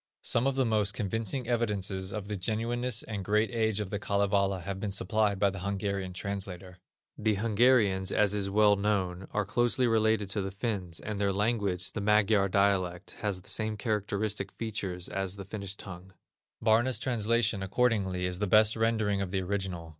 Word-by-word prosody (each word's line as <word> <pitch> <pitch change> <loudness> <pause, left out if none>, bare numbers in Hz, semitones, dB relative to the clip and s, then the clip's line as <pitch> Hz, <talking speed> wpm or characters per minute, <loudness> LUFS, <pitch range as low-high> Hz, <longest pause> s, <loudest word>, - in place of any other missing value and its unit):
Some 120 +3 +2
of 135 - 0
the 135 -1 +2
most 105 -3 +1
convincing 115 +4 -1
evidences 100 -5 -1
of 100 -1 -5
the 105 - -3
genuineness 115 +4 -1
and 105 -3 -5
great 105 +3 +1
age 110 -3 0
of 105 -3 -4
the 100 - -2
Kalevala 100 -2 +1
have 95 +1 -5
been 105 - -3
supplied 105 +1 +1
by 100 0 +2
the 100 - -7
Hungarian 100 0 -2
translator. 95 -1 -6 0.4
The 105 -1 +1
Hungarians, 105 -3 +3
as 105 -1 +3
is 100 -1 -1
well 105 +1 +5
known, 95 -3 -1
are 105 -1 -1
closely 120 +4 +2
related 110 -2 +2
to 100 +1 0
the 95 - -3
Finns, 95 -4 -3
and 105 -1 -4
their 100 -1 +2
language, 100 -3 0
the 110 - -4
Magyar 105 -1 +3
dialect, 95 -2 0
has 100 -3 -1
the - - -18
same 110 -1 -1
characteristic 105 -2 -2
features 100 -6 -4
as 95 0 -3
the 100 -1 -8
Finnish 100 -1 -5
tongue. 95 -1 -10 0.5
Barna's 120 +3 +3
translation, 115 -3 +1
accordingly, 95 -3 0
is 90 0 -2
the 105 - 0
best 110 +3 +5
rendering 110 -3 +1
of 95 - -2
the 95 0 -1
original. 90 -3 -3
100 Hz, 175 wpm, -29 LUFS, 95-110 Hz, 0.5 s, well